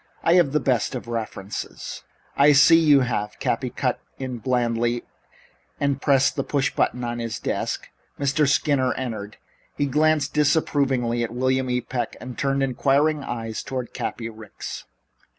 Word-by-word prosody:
I 165 - +4
have 175 -6 +4
the 150 - +2
best 130 -2 0
of 125 - -6
references 110 -4 -5 0.2
" - - -37
"I 145 +1 +6
see 155 +4 +7
you 150 -4 +5
have," 105 -4 -2
Cappy - - -1
cut - - -1 0.2
in 130 -2 -5
blandly, 120 0 0 0.8
and 140 -1 0
pressed 135 -2 +3
the - - -1
push 140 0 0
button 125 - 0
on 120 0 -3
his 115 -1 -3
desk. - - -3 0.3
Mr. 140 +1 +2
Skinner 140 -3 +2
entered. 110 -5 -5 0.4
He 145 - +1
glanced 150 +1 +2
disapprovingly 135 -5 +1
at 115 - -2
William 130 +1 +1
E. 125 0 +1
Peck 125 0 -3
and 125 - -7
then - - -10
turned 135 +1 0
inquiring 140 +3 +2
eyes 115 -3 -4
toward 130 -2 -5
Cappy 115 - -4
Ricks. 110 -1 -8
130 Hz, 160 wpm, -24 LUFS, 120-140 Hz, 0.8 s, see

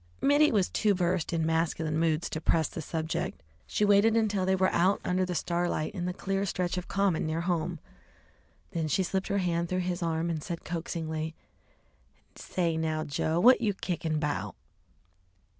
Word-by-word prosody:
Mittie 290 +2 +4
was 200 -5 +2
too 210 -2 +1
versed 180 -2 0
in 165 -2 0
masculine 160 -1 0
moods 165 0 +1
to 160 - -3
press 160 -1 +2
the 165 - -6
subject. 160 - -3 0.2
She 210 - +1
waited 205 +2 +5
until 205 -4 +1
they 190 - +3
were 185 0 +2
out 185 +4 +3
under 185 +1 +1
the 180 -1 -3
starlight 170 -1 -1
in 180 -4 -3
the 180 - -1
clear 195 +1 -2
stretch 180 -1 -1
of 180 -1 -4
common 195 -5 +1
near 160 +1 -1
home. 170 -1 -1 0.9
Then 165 -2 -1
she 170 +6 +1
slipped 190 +1 -2
her 200 - 0
hand 170 -2 0
through 185 0 0
his 180 0 -2
arm 165 0 0
and 160 -2 -3
said 170 -2 -5
coaxingly 160 -1 -3 1.0
"Say 170 -3 -2
now, 155 -1 -1
Joe, 160 +2 -1
what 250 +7 +6
you 205 -4 +1
kickin' 165 -5 -2
'bout?" 150 -1 -2
175 Hz, 175 wpm, -29 LUFS, 160-190 Hz, 1.0 s, what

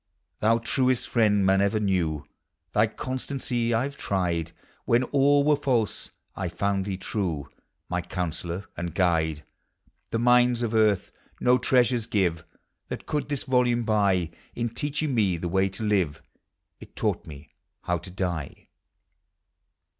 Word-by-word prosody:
Thou 115 +2 +4
truest 125 +2 +1
friend 105 -4 +3
man 95 +1 +4
ever 100 +2 +2
knew, 90 -7 0 0.5
Thy 105 +1 +4
constancy 125 -1 -3
I 115 +3 +2
\e - - -2
tried; 90 - -1 0.3
When 120 +2 +3
all 140 +2 +3
were 150 +1 +4
false, 125 -8 0 0.3
I 95 -3 -2
found 95 +2 -1
thee 95 -2 -3
true, 90 - -3 0.4
My - - -1
counsellor 90 +2 -4
and 85 -1 -5
guide. 80 -4 +1 0.7
The - - -1
mines 125 0 +4
of 115 -1 -1
earth 110 -3 +2 0.3
no 125 +1 +4
treasures 125 -2 +2
give 85 -6 0 0.4
That - - -6
could 150 -1 -2
this 145 -2 -2
volume 125 -2 +2
buy; 100 -6 +2 0.2
In 120 0 -1
teaching 145 +4 -2
me 100 -7 +2
the 85 - -3
way 95 +2 +2
to 95 +4 -7
live, 95 -9 0 0.6
It - - -14
taught - - -1
me 70 -1 -11 0.3
how 90 -1 0
to 95 - -10
die! 90 -6 -4
105 Hz, 145 wpm, -26 LUFS, 90-125 Hz, 0.7 s, Thou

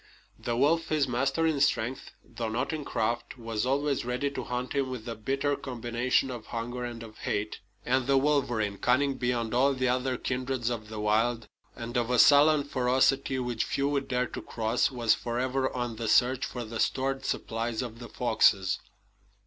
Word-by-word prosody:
The 120 -1 -2
wolf, 160 +5 +3
his 150 -3 +1
master 135 +6 0
in 155 -4 +1
strength, 130 -2 0
though 115 -2 -5
not 125 +7 -2
in 155 -2 -3
craft, 120 0 -2
was 115 -1 -2
always 140 +1 +1
ready 125 +3 -1
to 130 - -4
hunt 125 +1 -3
him 135 -2 0
with 125 -3 -6
a 115 - -3
bitter 135 +6 -1
combination 125 +1 -1
of 120 -3 -8
hunger 120 +1 -4
and 120 -1 -6
of 110 -1 -12
hate. 105 +1 -2 0.3
And 130 0 +1
the 135 -1 +4
wolverine, 120 -8 +1
cunning 135 +2 +2
beyond 120 -3 -1
all 135 +3 +3
the 130 -1 +1
other 130 0 0
kindreds 125 -2 -2
of 110 -2 -5
the 110 -1 -6
wild, 110 +2 +1 0.3
and 120 +1 -7
of 120 -1 0
a 125 - +2
sullen 145 +3 +6
ferocity 130 0 +1
which 125 -3 -1
few 140 +1 -1
would 140 -1 -1
dare 125 0 0
to - - -7
cross, 115 +1 0
was 120 -4 +2
forever 130 +2 -1
on 120 -3 -3
the 115 0 -3
search 125 +4 +3
for 125 - -5
the 110 +1 -6
stored 135 0 0
supplies 115 +1 -2
of 115 -2 -8
the 120 - -9
foxes. 110 -5 +2
125 Hz, 185 wpm, -28 LUFS, 115-135 Hz, 0.3 s, sullen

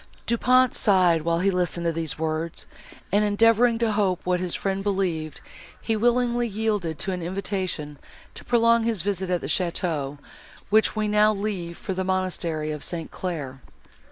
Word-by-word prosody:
Du 235 - +1
Pont 255 +1 +4
sighed, 180 -5 +4
while 170 +1 0
he 195 +1 +3
listened 180 -2 -1
to 170 - +2
these 165 -1 -3
words; 160 +1 -3 0.5
and, 205 +2 +3
endeavouring 230 +3 +4
to 230 -1 +1
hope 195 -4 +1
what 180 0 0
his 180 -1 -2
friend 195 0 -2
believed, 185 -6 -2 0.4
he 225 - -1
willingly 240 +1 +2
yielded 210 -7 -2
to 170 +7 -3
an 180 -1 -3
invitation 180 -5 -3 0.3
to - - -11
prolong 230 -1 +3
his 225 -6 0
visit 190 -2 -2
at 180 -1 0
the - - -5
château, 155 -3 -1 0.5
which 220 +1 +3
we 215 -1 0
now 210 +1 +4
leave 195 -5 -4
for 190 - -4
the 190 0 -2
monastery 180 -4 -2
of 150 -1 -5
St. 165 -2 -4
Claire. 145 -8 -5
185 Hz, 170 wpm, -25 LUFS, 170-215 Hz, 0.5 s, Pont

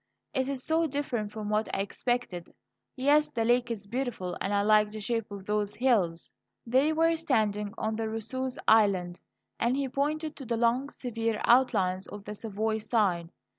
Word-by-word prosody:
It's 265 -1 -1
so 325 +1 +1
different 255 -7 -2
from 210 -1 -5
what 215 +1 0
I - - 0
expected. 200 -4 -3 0.4
Yes, 290 +3 +3
the 230 -2 -1
lake 240 +1 +3
is 220 -4 -4
beautiful, 230 -5 -3
and 195 - -1
I 200 0 +2
like 210 0 +4
the 215 +1 -7
shape 225 +1 -2
of 200 -2 -8
those 210 0 -1
hills." 200 -10 +1 0.3
They 260 +6 +3
were 330 +1 +3
standing 215 -10 0
on 220 0 -2
Rousseau's 225 +4 -3
Island, 190 -5 +3 0.4
and 240 +3 +1
he 280 -1 0
pointed 300 +4 -2
to 270 - -8
the 235 - 0
long, 240 +4 +2
severe 230 -5 -3
outlines 190 -7 +3
of 205 -1 -9
the 210 - -5
Savoy 220 +1 -2
side. 200 -7 0
225 Hz, 170 wpm, -29 LUFS, 205-260 Hz, 0.4 s, like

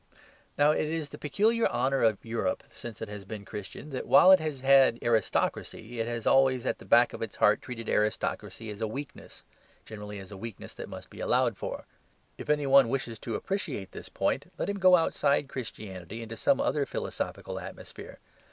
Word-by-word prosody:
Now, 145 +1 +5
it 155 - 0
is 155 -2 -3
the - - -10
peculiar 220 +11 +2
honour 135 +1 0
of 110 -2 +2
Europe 115 0 -2
since 115 -2 -8
it 110 - -6
has 105 -1 -7
been 100 +1 -8
Christian 105 +10 -8
that 130 - -4
while 185 - +8
it 190 - +8
has 155 -4 -4
had 135 -3 +6
aristocracy 115 +1 -1
it 115 - -1
has 120 -1 -4
always 130 -2 +4
at - - -1
the - - -13
back 120 +1 +5
of - - -7
its 115 -2 -4
heart 105 +1 +3
treated 115 -3 -7
aristocracy 105 +1 -1
as 105 +1 -9
a 110 - 0
weakness 135 +6 -8 0.4
generally 105 -1 -8
as 95 0 -10
a 100 - -8
weakness 115 +1 -8
that - - -8
must - - -10
be - - -12
allowed - - +2
for. - - -6 0.5
If - - -8
any 150 -1 +2
one 135 -3 +6
wishes 120 -4 -3
to 115 - -4
appreciate 150 - -3
this - - -9
point, - - -1
let - - -2
him 200 0 -2
go 185 -1 +7
outside 145 -4 +2
Christianity 110 -5 -7
into 115 0 -7
some 135 - +2
other 140 -1 +1
philosophical - - -4
atmosphere. - - -10
120 Hz, 195 wpm, -29 LUFS, 110-145 Hz, 0.5 s, while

